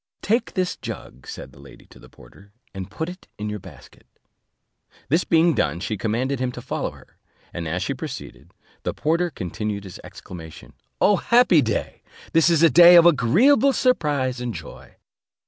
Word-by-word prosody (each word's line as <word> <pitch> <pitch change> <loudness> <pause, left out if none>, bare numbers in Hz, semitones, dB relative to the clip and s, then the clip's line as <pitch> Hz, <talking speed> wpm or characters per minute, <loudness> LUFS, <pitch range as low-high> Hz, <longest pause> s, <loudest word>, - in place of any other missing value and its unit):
"Take 230 +5 0
this 185 -1 -1
jug," 65 - -9
said - - -9
the - - -18
lady 70 -1 -15
to - - -18
the - - -16
porter, 100 +12 -19 0.2
"and 95 -2 -7
put 160 - -4
it 180 +1 -10
in 105 0 -4
your 105 - -5
basket." - - -16 1.0
This 160 +6 +2
being 165 0 +3
done, 80 - -1
she 105 +4 -3
commanded 120 +6 -2
him 130 -1 -1
to - - -8
follow - - -3
her; - - -19 0.3
and 85 -1 -5
as 90 +4 -2
she 140 - -2
proceeded, 135 0 -9 0.3
the - - -4
porter 170 +3 0
continued 105 - -5
his 95 -3 -10
exclamation, 80 -3 -11 0.3
"O 205 -1 +4
happy 235 -10 +4
day! 115 -5 -3 0.3
This 165 +1 +4
is 165 -1 +3
a 165 - +7
day 175 +4 +8
of 170 -1 +8
agreeable 215 - +4
surprise 145 - 0
and 120 -2 -4
joy." - - -11
135 Hz, 175 wpm, -22 LUFS, 105-175 Hz, 1.0 s, day